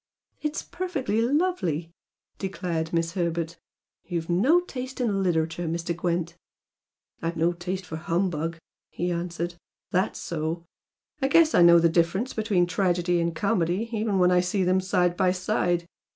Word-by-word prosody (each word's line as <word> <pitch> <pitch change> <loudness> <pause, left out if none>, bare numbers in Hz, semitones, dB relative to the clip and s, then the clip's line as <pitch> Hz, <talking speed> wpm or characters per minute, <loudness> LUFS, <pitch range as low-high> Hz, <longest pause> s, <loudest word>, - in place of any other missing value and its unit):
"It's 300 0 -2
perfectly 305 - -2
lovely!" 235 - 0 0.5
declared 175 -4 -3
Miss 165 -1 0
Herbert 170 -2 -2 0.4
"You've 170 -2 -3
no 265 - +4
taste 260 -6 -7
in 210 -6 +1
literature, 165 -1 0
Mr. 170 +1 -2
Gwent!" 175 -1 -1 0.9
"I've 165 0 -2
no 165 +2 +2
taste 180 +2 -4
for 160 -2 -6
humbug" 165 -1 -1 0.3
he 175 +1 -2
answered 175 0 -3 0.3
"That's 185 +2 +1
so! 165 +1 -3 0.6
I 270 - +3
guess 320 +3 +5
I - - +5
know 170 0 +8
the 170 0 +5
difference 170 +8 +1
between 210 -5 +2
tragedy 175 -1 +1
and 170 -1 -1
comedy, 195 +3 0
even 215 -2 0
when 180 -1 +4
I 180 - +5
see 180 +2 0
them 185 +1 +2
side 180 -1 +1
by 185 0 +3
side." 180 -2 0
175 Hz, 150 wpm, -26 LUFS, 170-200 Hz, 0.9 s, know